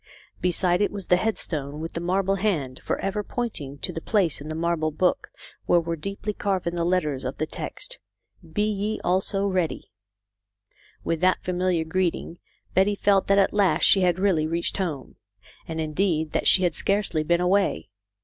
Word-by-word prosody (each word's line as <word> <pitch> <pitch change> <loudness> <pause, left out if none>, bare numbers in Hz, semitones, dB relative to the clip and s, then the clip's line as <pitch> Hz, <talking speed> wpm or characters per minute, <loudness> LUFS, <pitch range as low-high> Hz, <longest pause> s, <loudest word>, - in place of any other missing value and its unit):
Beside 180 +1 +2
it 205 - +2
was 200 -3 -6
the 180 - +4
headstone 155 -8 -2
with 165 +1 -5
the - - -3
marble 190 +2 +1
hand 155 -11 -1
for - - -1
ever 195 +2 -1
pointing 175 - -4
to - - -4
the 165 - -5
place 185 -9 +1
in 150 - -7
the 155 - -4
marble 165 -1 0
book 175 +4 0 0.4
where 175 - +5
were 170 0 -2
deeply 200 +5 -4
carven 190 -4 -1
the 170 -1 -1
letters 160 -6 0
of 130 +1 -4
the 155 - -1
text, - - -6 0.3
" 165 -3 -22
Be 210 - +3
ye 210 0 -1
also 195 +2 +1
ready.''' 185 -4 -1 1.1
With 165 -1 -1
that 185 0 +2
familiar 180 -2 0
greeting 170 0 -2 0.3
Betty 195 +2 +3
felt 200 -1 +2
that 200 - +4
at 195 - +3
last 195 -6 +2
she 195 - +6
had 180 -1 +2
really 185 -5 +2
reached 170 +1 -1
home, 160 -9 -4 0.5
and 160 -1 -4
indeed 160 0 0
that - - 0
she 185 - +6
had 175 - +2
scarcely 200 -5 0
been 170 +3 +2
away. 180 - +1
180 Hz, 180 wpm, -25 LUFS, 160-195 Hz, 1.1 s, she